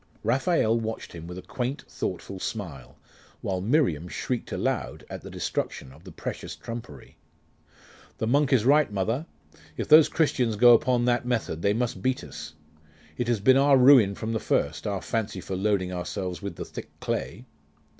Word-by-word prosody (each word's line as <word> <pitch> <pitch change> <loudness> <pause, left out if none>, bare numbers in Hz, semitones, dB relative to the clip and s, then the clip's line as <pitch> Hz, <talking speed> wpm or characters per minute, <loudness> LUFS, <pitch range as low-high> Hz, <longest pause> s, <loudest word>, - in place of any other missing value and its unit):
Raphael 115 -1 +2
watched 110 0 -5
him 85 -1 -8
with 90 +1 -7
a 95 - -8
quaint 130 +2 -4
thoughtful 95 - -5
smile, 85 - -6 0.4
while 95 -1 -2
Miriam 100 - +1
shrieked 120 +6 -4
aloud - - -2
at - - -6
the - - -9
destruction 65 - -4
of 80 +6 -18
the 95 - -9
precious - - -6
trumpery. 115 0 -9 1.0
'The - - -2
monk 140 +4 +2
is 120 -5 +3
right, 145 -2 +4
mother. 115 - -1 0.5
If - - -3
those 155 0 +8
Christians 125 -8 +1
go 120 +3 +7
on - - +10
upon 120 -1 +1
that 120 0 +1
method, 115 -10 -1
they 100 +2 +2
must 115 -4 -2
beat 130 +4 0
us. 75 +1 -9 0.6
It 120 - -2
has 120 -3 +1
been 130 +6 +5
our 140 0 +5
ruin 125 -6 +6
from 110 +2 -4
the 110 - 0
first, 75 +3 -1
our 100 -2 -2
fancy 110 -4 -2
for 95 +1 -5
loading 95 -1 0
ourselves 90 0 -4
with - - -5
the - - -6
thick - - -9
clay. 110 +9 -3
110 Hz, 175 wpm, -26 LUFS, 95-125 Hz, 1.0 s, on